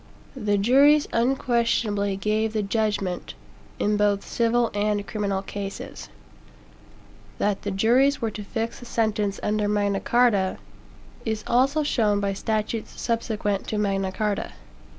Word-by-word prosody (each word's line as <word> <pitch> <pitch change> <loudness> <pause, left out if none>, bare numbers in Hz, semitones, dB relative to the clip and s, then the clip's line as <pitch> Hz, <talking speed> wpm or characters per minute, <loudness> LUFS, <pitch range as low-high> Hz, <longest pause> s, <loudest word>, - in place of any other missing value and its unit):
The 210 -5 0
juries 280 +8 +5
unquestionably 230 -5 +1
gave 215 +2 0
the 215 -2 0
"judgment" 200 -3 -2 0.4
in 210 0 +1
both 205 -1 +1
civil 235 0 +1
and 205 0 0
criminal 200 -3 -2
cases. 195 0 -7 1.3
That 205 -1 0
the 205 - -3
juries 240 +8 +3
were 225 -2 -1
to 210 - -7
fix 225 +3 -4
the 245 - -11
sentence 215 -3 0
under 210 0 0
Magna 205 -1 +1
Carta, 225 -6 +2 0.7
is 220 -1 -2
also 275 +5 +2
shown 215 -8 +2
by 200 -1 -1
statutes 215 +2 -3
subsequent 215 -4 -1
to 215 - -2
Magna 195 -2 0
Carta. 210 0 -2
210 Hz, 130 wpm, -25 LUFS, 200-230 Hz, 1.3 s, juries